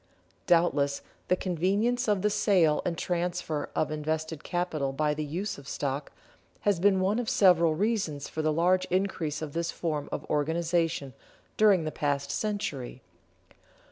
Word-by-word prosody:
Doubtless 145 -5 +2 0.2
the 180 - +3
convenience 200 +8 0
of 205 -3 +1
the 210 - +2
sale 180 -8 +3
and 170 -2 -2
transfer 175 -3 -2
of 155 - 0
invested 155 0 -3
capital 160 -6 -2
by 150 +1 +1
the 155 +1 -3
use 170 +5 -4
of 140 - -14
stock, 140 +1 -3 0.5
has 205 -4 +2
been 190 0 +3
one 200 +5 +1
of 240 - -2
several 170 -5 +4
reasons 190 -7 -1
for 160 - -4
the 155 0 +1
large 180 +4 +2
increase 180 -5 -1
of 145 -2 -6
this 170 0 -1
form 155 -5 -3
of 150 - -5
organization 160 -1 0 0.4
during 205 -5 +5
the 155 - -3
past 145 -2 -1
century. 145 - -3
165 Hz, 150 wpm, -28 LUFS, 150-185 Hz, 0.5 s, during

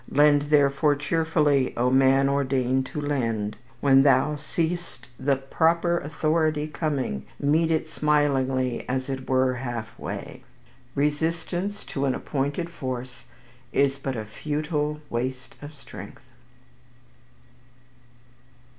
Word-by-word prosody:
"Lend 145 0 +5
therefore 145 0 +4
cheerfully, 150 -2 +1
O 125 +1 +2
man 135 +1 +5
ordained 130 -1 +1
to 150 - -5
lend. 115 -8 -1 0.3
When 135 -1 +6
thou 140 +2 +4
seest 160 -3 -3
the 140 +1 +2
proper 165 +5 +1
authority 155 0 0
coming, 140 - -2
meet 155 +3 +2
it 160 -1 0
smilingly, 135 -4 +1
as 130 +1 -2
it 130 -1 -5
were 130 0 +3
halfway." 120 -2 -6 0.5
Resistance 165 +7 -1
to 140 0 -3
an 130 - +1
appointed 145 +5 -2
force 130 -5 -6 0.5
is 140 0 +2
but 135 -1 -3
a 110 -2 -4
futile 150 +5 -2
waste 130 +2 -3
of 145 +1 -9
strength. 100 -7 -11
140 Hz, 110 wpm, -25 LUFS, 130-150 Hz, 0.5 s, When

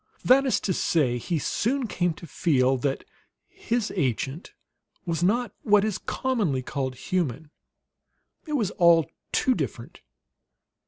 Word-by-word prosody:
That 270 +2 +5
is 260 - +2
to 190 - 0
say, 130 -8 +1
he 170 +7 -2
soon 245 - -1
came 175 -6 -1
to 170 - -11
feel 135 -6 +2
that 135 +2 -2 0.4
his 230 -2 -2
agent 135 - -2 0.5
was 170 -1 -2
not 220 +4 +1
what 210 -1 +4
is 215 -3 -2
commonly 205 - -1
called 130 0 -3
human. 155 -2 -2 1.0
It 305 - -4
was 220 -9 0
all 170 -5 +4 0.2
too 260 - +2
different. - - -5
175 Hz, 130 wpm, -26 LUFS, 140-220 Hz, 1.0 s, That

